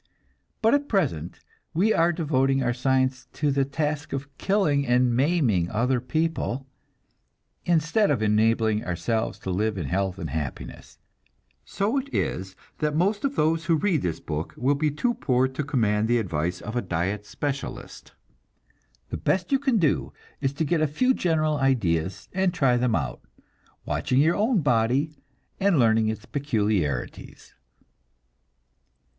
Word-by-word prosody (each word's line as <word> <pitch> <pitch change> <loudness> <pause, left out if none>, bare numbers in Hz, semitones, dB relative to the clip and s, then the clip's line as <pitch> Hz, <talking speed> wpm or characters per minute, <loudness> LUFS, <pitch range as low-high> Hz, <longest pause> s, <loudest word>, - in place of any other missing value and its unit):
But 225 - +5
at 285 0 +1
present 125 - -1 0.3
we 210 +6 +3
are 170 +1 +3
devoting 135 -5 +1
our 120 -1 +1
science 130 +1 0
to 150 -1 0
the 140 0 +2
task 150 +2 -3
of 140 0 -5
killing 190 -9 +2
and 125 0 +3
maiming 130 - +2
other 125 +4 +1
people, 155 -2 -1 1.0
instead 170 +5 +2
of 130 -7 +1
enabling 110 0 +2
ourselves 90 +6 -2
to 95 - -3
live 105 +3 0
in 85 - -3
health 95 +5 -1
and - - -5
happiness; 75 -3 -6 0.7
so 215 +8 0
it 275 +1 -8
is 95 - -2 0.2
that 150 -1 0
most 200 +6 +1
of 275 0 -1
those 160 +2 +1
who 170 -1 +3
read 160 -2 +1
this 85 -3 -2
book 75 0 -5
will 130 +4 +2
be 150 +2 +1
too 240 - 0
poor 130 - +1
to 130 +3 -4
command 110 -7 +1
the 120 +1 +3
advice 90 -4 -2
of 110 +3 -6
a 120 - +1
diet 95 +2 -2
specialist. 140 -1 -5 1.0
The - - -3
best 185 +5 0
you 275 - +3
can 265 -4 +1
do 160 -7 +1 0.3
is 135 -2 0
to 160 +3 -1
get 165 +1 +1
a 155 - +3
few 255 - +2
general 155 - +1
ideas 95 - 0
and 190 -1 +1
try 135 -8 +2
them 120 -2 +1
out, 65 -5 -3 0.6
watching 85 - 0
your 160 +4 +4
own 215 -1 +2
body 135 +3 +1 0.4
and 195 -4 +3
learning 110 -3 +3
its 110 0 -3
peculiarities. 105 - -2
135 Hz, 150 wpm, -25 LUFS, 110-160 Hz, 1.0 s, But